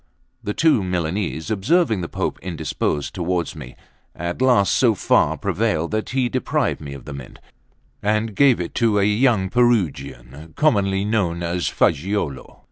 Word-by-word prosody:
The 105 Hz, -, -3 dB
two 155 Hz, -10 st, +3 dB
Milanese, 90 Hz, -1 st, -2 dB
observing 110 Hz, -, +1 dB
the 85 Hz, -, -5 dB
Pope -, -, -3 dB
indisposed 80 Hz, -4 st, -3 dB
towards 85 Hz, -2 st, -2 dB
me, 65 Hz, -, -10 dB, 0.4 s
at 85 Hz, +6 st, -4 dB
last 125 Hz, -7 st, +4 dB
so 120 Hz, -4 st, +3 dB
far -, -, +2 dB
prevailed 80 Hz, +2 st, -1 dB
that 110 Hz, 0 st, -2 dB
he 130 Hz, -1 st, 0 dB
deprived 120 Hz, -, -1 dB
me 70 Hz, -2 st, -7 dB
of 70 Hz, -, -12 dB
the 75 Hz, -, -7 dB
Mint, 70 Hz, -3 st, -10 dB, 0.6 s
and 110 Hz, +1 st, 0 dB
gave 135 Hz, -3 st, +4 dB
it 85 Hz, -, -4 dB
to 110 Hz, -3 st, +3 dB
a 100 Hz, -, +3 dB
young 105 Hz, -1 st, +2 dB
Perugian, 80 Hz, -, -1 dB
commonly 100 Hz, -9 st, +2 dB
known 90 Hz, -6 st, 0 dB
as 85 Hz, +1 st, -1 dB
Fagiuolo. 85 Hz, -4 st, -1 dB
95 Hz, 150 wpm, -21 LUFS, 80-110 Hz, 0.6 s, last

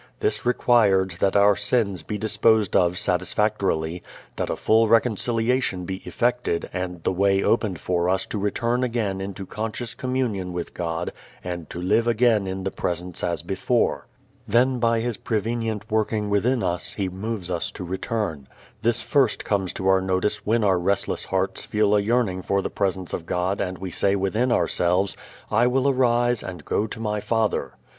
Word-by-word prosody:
This 110 Hz, +3 st, -1 dB
required 105 Hz, -7 st, +3 dB
that 100 Hz, 0 st, +2 dB
our 100 Hz, 0 st, +6 dB
sins 100 Hz, -3 st, 0 dB
be 105 Hz, +7 st, -4 dB
disposed 110 Hz, -1 st, +2 dB
of 90 Hz, -2 st, +3 dB
satisfactorily, 90 Hz, -3 st, 0 dB, 0.3 s
that -, -, -2 dB
a -, -, 0 dB
full 110 Hz, +1 st, +3 dB
reconciliation 115 Hz, -2 st, +1 dB
be 95 Hz, +1 st, -4 dB
effected 120 Hz, -7 st, 0 dB
and 90 Hz, -2 st, -4 dB
the -, -, +1 dB
way 95 Hz, +1 st, +2 dB
opened 105 Hz, -7 st, +1 dB
for 90 Hz, -1 st, 0 dB
us 95 Hz, 0 st, +1 dB
to 105 Hz, -, -4 dB
return 115 Hz, +5 st, 0 dB
again 110 Hz, -6 st, -1 dB
into 95 Hz, 0 st, -6 dB
conscious 110 Hz, +4 st, -4 dB
communion 120 Hz, -8 st, -2 dB
with 85 Hz, -1 st, -5 dB
God 85 Hz, 0 st, -3 dB, 0.3 s
and 85 Hz, -3 st, -5 dB
to -, -, -6 dB
live 105 Hz, +6 st, +2 dB
again 115 Hz, -3 st, +3 dB
in 95 Hz, 0 st, -4 dB
the 95 Hz, -, -2 dB
Presence 90 Hz, 0 st, -4 dB
as 85 Hz, -3 st, -1 dB
before. 115 Hz, +7 st, 0 dB, 0.4 s
Then 125 Hz, +4 st, +3 dB
by 115 Hz, -1 st, +2 dB
His 120 Hz, -1 st, -2 dB
prevenient 110 Hz, -1 st, -2 dB
working 110 Hz, -1 st, 0 dB
within 115 Hz, +4 st, +2 dB
us 85 Hz, 0 st, -1 dB
He 100 Hz, -2 st, -2 dB
moves 95 Hz, 0 st, -4 dB
us 85 Hz, -2 st, -2 dB
to -, -, -7 dB
return. 90 Hz, -5 st, -3 dB, 0.3 s
This 115 Hz, 0 st, +1 dB
first 135 Hz, -6 st, +1 dB
comes 95 Hz, -3 st, 0 dB
to 95 Hz, -, -3 dB
our 95 Hz, 0 st, +4 dB
notice 95 Hz, +3 st, -1 dB
when 115 Hz, +1 st, +2 dB
our 95 Hz, -3 st, +3 dB
restless 100 Hz, +3 st, -1 dB
hearts -, -, -1 dB
feel 105 Hz, -1 st, +2 dB
a -, -, +4 dB
yearning 105 Hz, -3 st, +1 dB
for 100 Hz, +2 st, 0 dB
the -, -, -3 dB
Presence 95 Hz, -2 st, -2 dB
of 85 Hz, -, -4 dB
God 90 Hz, +3 st, -1 dB
and 95 Hz, -1 st, -3 dB
we 95 Hz, -1 st, -6 dB
say 100 Hz, +4 st, +2 dB
within 105 Hz, +6 st, 0 dB
ourselves, 90 Hz, -3 st, +1 dB, 0.4 s
"I 115 Hz, +3 st, +4 dB
will 130 Hz, +2 st, +2 dB
arise 120 Hz, -3 st, +2 dB
and 90 Hz, -5 st, -8 dB
go 105 Hz, -, 0 dB
to 110 Hz, -, -7 dB
my 105 Hz, -1 st, -1 dB
Father." 110 Hz, 0 st, -1 dB
100 Hz, 175 wpm, -24 LUFS, 95-115 Hz, 0.4 s, our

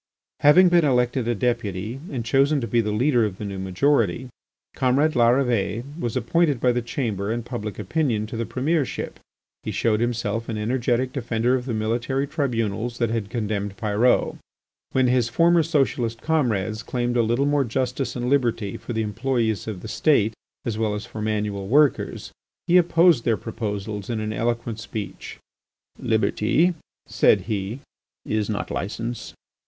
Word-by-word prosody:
Having 175 Hz, +5 st, +7 dB
been 175 Hz, -1 st, +4 dB
elected 125 Hz, -3 st, +1 dB
a 120 Hz, -, +1 dB
Deputy 115 Hz, 0 st, -2 dB
and 120 Hz, -5 st, -3 dB
chosen 140 Hz, +4 st, +3 dB
to 120 Hz, -, -3 dB
be 115 Hz, +1 st, +2 dB
the 105 Hz, -1 st, -2 dB
leader 120 Hz, +3 st, +2 dB
of 100 Hz, -4 st, -2 dB
the 105 Hz, -, -6 dB
new 100 Hz, -1 st, -5 dB
majority, 115 Hz, +3 st, +1 dB, 0.5 s
comrade 135 Hz, +5 st, +2 dB
Larrivée 120 Hz, -3 st, +2 dB, 0.2 s
was 120 Hz, -3 st, -2 dB
appointed 145 Hz, +2 st, +1 dB
by 125 Hz, +2 st, +3 dB
the 120 Hz, 0 st, 0 dB
Chamber 110 Hz, -4 st, -2 dB
and 120 Hz, 0 st, -3 dB
public 110 Hz, -4 st, -5 dB
opinion 110 Hz, -, 0 dB
to 110 Hz, -, -7 dB
the 115 Hz, 0 st, -3 dB
Premiership. 145 Hz, +2 st, -2 dB, 0.4 s
He -, -, -5 dB
showed 110 Hz, -2 st, +1 dB
himself 115 Hz, -1 st, -2 dB
an 110 Hz, -, -2 dB
energetic 125 Hz, +3 st, 0 dB
defender 120 Hz, -2 st, 0 dB
of 125 Hz, -1 st, 0 dB
the 120 Hz, -4 st, -2 dB
military 120 Hz, +5 st, -1 dB
tribunals 120 Hz, -5 st, -2 dB
that 115 Hz, -2 st, 0 dB
had 110 Hz, -3 st, -2 dB
condemned 105 Hz, -3 st, -3 dB
Pyrot. 110 Hz, +3 st, +2 dB, 0.5 s
When 130 Hz, -1 st, +2 dB
his 125 Hz, -1 st, +2 dB
former 170 Hz, +6 st, +4 dB
socialist 135 Hz, -7 st, 0 dB
comrades 110 Hz, -, 0 dB
claimed 120 Hz, 0 st, -2 dB
a 120 Hz, -, +4 dB
little 120 Hz, +5 st, +1 dB
more 145 Hz, -1 st, +2 dB
justice 130 Hz, +2 st, -2 dB
and 125 Hz, 0 st, -2 dB
liberty 120 Hz, -7 st, 0 dB
for 120 Hz, -, -7 dB
the 110 Hz, -1 st, 0 dB
employés 115 Hz, -1 st, -1 dB
of 100 Hz, -5 st, -5 dB
the -, -, -7 dB
State 115 Hz, -4 st, +2 dB, 0.3 s
as 110 Hz, -2 st, -2 dB
well 110 Hz, -2 st, 0 dB
as 105 Hz, -, -5 dB
for 110 Hz, -, -7 dB
manual 105 Hz, -2 st, -2 dB
workers, 145 Hz, +5 st, +2 dB, 0.3 s
he 175 Hz, -, +2 dB
opposed 170 Hz, -5 st, +4 dB
their 115 Hz, -3 st, +2 dB
proposals 105 Hz, -2 st, -5 dB
in 115 Hz, -2 st, -1 dB
an 110 Hz, 0 st, -3 dB
eloquent 115 Hz, -1 st, -2 dB
speech. 110 Hz, -2 st, -7 dB, 0.6 s
"Liberty," 175 Hz, +3 st, +2 dB, 0.3 s
said 100 Hz, -, +3 dB
he, 105 Hz, +4 st, -4 dB, 0.4 s
"is 110 Hz, -1 st, -1 dB
not 105 Hz, -, -3 dB
licence. 115 Hz, +4 st, -4 dB
120 Hz, 160 wpm, -23 LUFS, 110-130 Hz, 0.6 s, Having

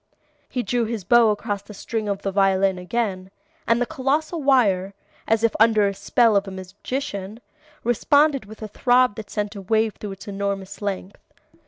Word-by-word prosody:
He 250 Hz, -2 st, -2 dB
drew 240 Hz, -1 st, 0 dB
his 220 Hz, -3 st, -4 dB
bow 235 Hz, +3 st, +5 dB
across 205 Hz, -1 st, -2 dB
the 200 Hz, +1 st, -12 dB
string 215 Hz, +1 st, -3 dB
of 200 Hz, 0 st, -3 dB
the 195 Hz, -, -1 dB
violin 195 Hz, -1 st, +2 dB
again, 190 Hz, -1 st, -2 dB, 0.4 s
and 230 Hz, 0 st, +3 dB
the 245 Hz, -, +1 dB
colossal 310 Hz, +4 st, -1 dB
wire, 200 Hz, -9 st, +2 dB, 0.3 s
as 225 Hz, 0 st, +2 dB
if 230 Hz, -, +2 dB
under 215 Hz, -2 st, +5 dB
the 200 Hz, -, -1 dB
spell 215 Hz, +3 st, +2 dB
of 200 Hz, 0 st, +2 dB
a -, -, -4 dB
magician, 200 Hz, +2 st, -5 dB, 0.4 s
responded 275 Hz, +3 st, +3 dB
with 220 Hz, +2 st, -11 dB
a -, -, -4 dB
throb 250 Hz, +2 st, +3 dB
that 215 Hz, -2 st, -7 dB
sent 210 Hz, 0 st, -3 dB
a 200 Hz, -, -6 dB
wave 220 Hz, +2 st, +1 dB
through 205 Hz, -2 st, -5 dB
its 195 Hz, -, -13 dB
enormous 200 Hz, 0 st, -4 dB
length. 195 Hz, -1 st, -4 dB
210 Hz, 180 wpm, -23 LUFS, 195-235 Hz, 0.4 s, bow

